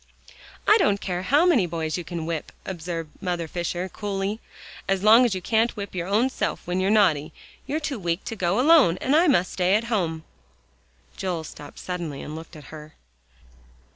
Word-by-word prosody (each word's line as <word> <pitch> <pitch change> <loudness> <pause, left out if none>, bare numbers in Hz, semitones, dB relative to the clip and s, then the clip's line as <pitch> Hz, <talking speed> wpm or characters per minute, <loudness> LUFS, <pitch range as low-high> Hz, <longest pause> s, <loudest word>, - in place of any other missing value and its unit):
"I 425 +2 +6
don't 205 - +2
care 180 -2 -3
how 290 - +3
many 260 - +4
boys 160 -2 -3
you 175 - -4
can 165 -1 -5
whip," 165 -2 -4
observed 165 -3 -5
Mother 175 -3 -2
Fisher 175 +2 -3
coolly, 200 +2 -3 0.5
"as 195 0 0
long 225 +4 +7
as 225 -5 0
you 185 - -5
can't 225 +3 +1
whip 200 -1 -6
your 175 -1 -3
own 215 +6 +3
self - - -3
when 180 +1 -1
you're 190 +1 +1
naughty, 180 -9 +3 0.4
you're 305 - -1
too 295 -6 -4
weak 175 0 -2
to 225 - -5
go 185 0 0
alone, 275 - +5
and 270 - +1
I 340 +3 +5
must 185 - +2
stay 185 +1 +2
at 215 - +1
home." 165 -6 -1 0.9
Joel 180 -4 -2
stopped 145 -1 -11
suddenly 170 -6 -5
and 150 - -7
looked 160 +1 -10
at 150 - -11
her. 155 0 -11
185 Hz, 190 wpm, -24 LUFS, 170-215 Hz, 0.9 s, long